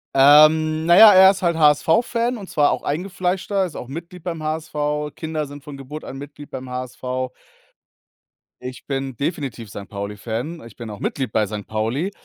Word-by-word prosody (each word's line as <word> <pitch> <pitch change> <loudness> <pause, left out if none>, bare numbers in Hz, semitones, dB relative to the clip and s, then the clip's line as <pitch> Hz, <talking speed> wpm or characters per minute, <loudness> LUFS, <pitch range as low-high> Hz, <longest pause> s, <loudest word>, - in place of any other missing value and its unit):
Ähm, 155 +3 +6
na 175 - +6
ja, 215 -1 +10
er 190 0 +8
ist 195 -1 -6
halt 170 -2 +1
HSV-Fan 230 - +2
und 195 -3 -10
zwar 145 -1 +3
auch - - -3
eingefleischter, 185 +4 -1
ist 175 - -8
auch 125 - -7
Mitglied 170 +4 -9
beim 165 -3 -4
HSV, 150 -1 -3
Kinder 155 -1 -3
sind 145 0 -11
von 140 0 -9
Geburt 140 +3 -8
an 135 - -8
Mitglied 145 +1 -10
beim 130 -1 -7
HSV. 125 0 -6 1.6
Ich 125 0 -8
bin 135 -2 -3
definitiv 140 - -4
Sankt-Pauli-Fan, 105 +9 -6
ich 110 - -16
bin 115 -3 -8
auch 105 - -9
Mitglied 130 -3 -3
bei 110 -1 +1
Sankt 105 0 -6
Pauli. 115 - -2
150 Hz, 170 wpm, -21 LUFS, 130-170 Hz, 1.6 s, ja